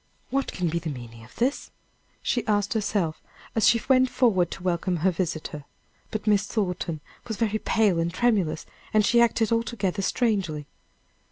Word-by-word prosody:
"What 275 +1 0
can 180 -2 -1
be 170 +1 0
the 165 -1 -4
meaning 120 -4 -8
of 115 - -17
this?" 260 +4 0 0.5
she 240 - 0
asked 205 -1 +1
herself, 200 -7 -1 0.3
as 220 -1 +3
she 230 - +5
went 260 -1 +5
forward 195 -11 +3
to 190 - -8
welcome 180 0 0
her 190 - +5
visitor. 160 -4 -3 0.5
But 215 -1 -4
Miss 205 -1 +3
Thornton 180 -6 -2 0.3
was 220 -3 -3
very 220 -2 0
pale 210 -7 +2
and 165 +1 0
tremulous, 185 -7 +1 0.3
and 215 -1 +5
she 235 +2 +5
acted 230 -2 +2
altogether 225 -4 0
strangely. 190 - 0
200 Hz, 165 wpm, -26 LUFS, 170-225 Hz, 0.5 s, she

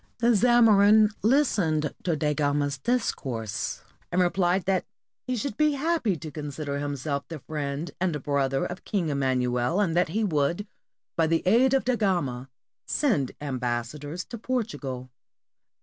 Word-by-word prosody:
The 240 0 +3
Zamorin 215 -2 +6
listened 195 - +2
to 170 -3 0
Da 150 -1 0
Gama's 145 -2 0
discourse, 130 - -2 0.3
and 180 - +1
replied 180 +1 +2
that 190 -1 +1 0.4
he 255 - 0
should 245 0 -3
be 305 -1 +3
happy 285 - 0
to 155 +1 -8
consider 145 0 -4
himself 140 0 -3
the 165 - -6
friend 150 +1 -4
and 165 -6 -1
brother 135 -2 0
of 175 +1 -6
King 185 -7 -1
Emmanuel, 130 +2 0
and 180 -6 +1
that 175 -2 +2
he 220 +7 0
would, 170 +1 0 0.5
by 165 -1 +2
the 165 0 +1
aid 245 +7 +4
of 270 - +1
Da 255 0 +2
Gama, 140 - -1 0.4
send 200 - +1
ambassadors 135 +4 -3
to 235 - -8
Portugal. 145 - -3
165 Hz, 145 wpm, -26 LUFS, 140-210 Hz, 0.5 s, Zamorin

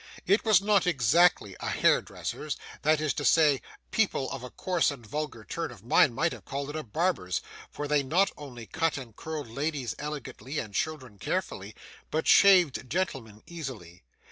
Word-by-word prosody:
It 200 +4 +3
was 210 -4 +4
not 200 -3 +3
exactly 155 - +3
a - - -3
hairdresser's; - - 0 0.2
that 155 0 +3
is 155 -2 0
to 145 - -4
say, 150 -4 +4 0.3
people 205 -11 0
of 135 - -5
a 125 - -7
coarse 180 +3 0
and 135 -5 -7
vulgar 150 -2 -4
turn 165 +8 -4
of 120 -5 -13
mind 120 +1 +4
might 165 +5 +1
have - - -9
called 140 +1 -4
it - - -9
a 155 - -2
barber's; 140 - -1 0.3
for 145 - -5
they 150 0 +3
not 175 +9 +2
only 125 -6 -9
cut 165 +3 -1
and 120 -5 -9
curled 155 -3 -5
ladies 140 +1 -3
elegantly, 150 -1 -6
and 105 -7 -4
children 130 -5 -3
carefully, - - -3 0.3
but 160 +1 -1
shaved 180 -10 +5
gentlemen 125 - -3
easily. 125 - -8
145 Hz, 170 wpm, -28 LUFS, 125-165 Hz, 0.3 s, shaved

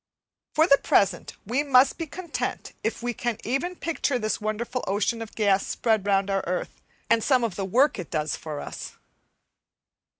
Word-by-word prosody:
For 315 - +5
the 280 -4 +5
present 195 -3 +2
we 245 +7 +1
must 270 0 +4
be 330 - -3
content 345 +3 -4
if 225 +1 -2
we 240 0 -1
can 235 -1 -2
even 275 +10 -1
picture 315 -6 -1
this 215 -2 -2
wonderful 225 +4 -2
ocean 210 +4 0
of 225 - -8
gas 200 -3 +2
spread 220 -4 0
round 195 0 +2
our 195 0 0
earth, 180 +1 -3 0.3
and 230 -1 +3
some 255 -3 +3
of 225 -6 -1
the 195 - -2
work 250 +6 +3
it 175 - -6
does 155 -1 -1
for 150 -2 -6
us. - - -7
225 Hz, 175 wpm, -26 LUFS, 195-260 Hz, 0.3 s, For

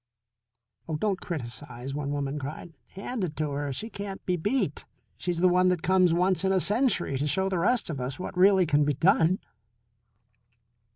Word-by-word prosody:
"Oh, 160 - -1
don't 195 +1 -1
criticise," 125 -3 -6
one 145 -1 -3
woman 145 0 -2
cried. 150 +4 -7 0.2
"Hand 210 +3 -4
it 160 -4 -3
to 155 -2 -2
her! 140 0 -3
She 220 - -4
can't 200 -1 -7
be 180 - +1
beat. 195 - -1 0.3
She's 175 -1 -3
the 185 - +6
one 180 +1 +3
that 180 -3 0
comes 185 -1 +4
once 180 +3 +1
in 190 - +2
a 190 - +3
century 210 - +2
to 145 - 0
show 190 +6 +2
the 185 -2 -1
rest 235 +6 +2
of 145 -6 -4
us 130 +2 -3
what 185 - -6
really 190 0 +5
can 150 -2 +3
be 145 0 +1
done." 170 +3 +3
175 Hz, 185 wpm, -27 LUFS, 145-190 Hz, 0.3 s, the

